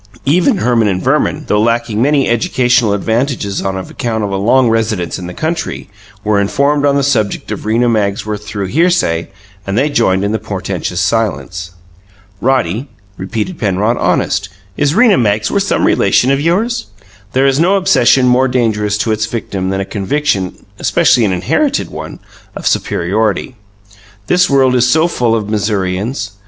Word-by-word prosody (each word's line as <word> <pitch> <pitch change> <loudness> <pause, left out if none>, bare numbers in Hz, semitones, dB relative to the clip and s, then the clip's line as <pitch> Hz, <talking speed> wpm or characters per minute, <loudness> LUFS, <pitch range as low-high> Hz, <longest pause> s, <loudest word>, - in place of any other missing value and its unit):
Even 180 - +3
Herman 120 - +2
and 95 -2 0
Verman, - - 0
though 105 - +1
lacking 115 -1 0
many 140 +1 +2
educational 120 -1 +2
advantages 110 -1 -1
on 95 -1 -2
account 110 +3 -3
of 100 - -2
a - - -1
long 120 +6 +3
residence 110 -7 -1
in 90 - -7
the - - -6
country, 160 - -4 0.3
were 105 -1 +1
informed 140 +8 +1
on 140 - +2
the 140 - +1
subject 115 -7 -1
of - - -5
Rena 115 +3 +2
Magsworth 105 -1 -1
through 105 -1 -4
hearsay, 140 - +1 0.4
and 100 +2 -1
they 145 +4 +1
joined 95 -7 +1
in 100 - 0
the 110 - -1
portentous 100 -2 -4
silence. 85 -6 -1 0.7
"Roddy," 130 - 0 0.3
repeated 110 - -4
Penrod, 105 +2 0
"honest, 90 +1 0 0.3
is 145 +4 0
Rena 225 -4 +5
Magsworth 110 - +1
some - - +1
relation 130 - +3
of 140 +1 +1
yours?" 175 - 0 0.5
There 130 +1 +2
is 135 +1 +2
no 180 +4 +3
obsession 185 -9 +3
more 125 +1 +3
dangerous 110 -5 0
to 110 +1 -1
its 110 0 -1
victims 100 -5 -4
than 95 0 -1
a - - -3
conviction 100 -2 -2
especially 120 - +3
an 100 - 0
inherited 90 -1 0
one - - -7 0.4
of - - -7
superiority: 105 +7 -1 0.7
this 180 - +2
world 135 -2 +3
is 125 -1 +3
so 160 +5 +3
full 120 -9 0
of 105 -2 -2
Missourians. 105 +3 -2
115 Hz, 160 wpm, -14 LUFS, 100-135 Hz, 0.7 s, Rena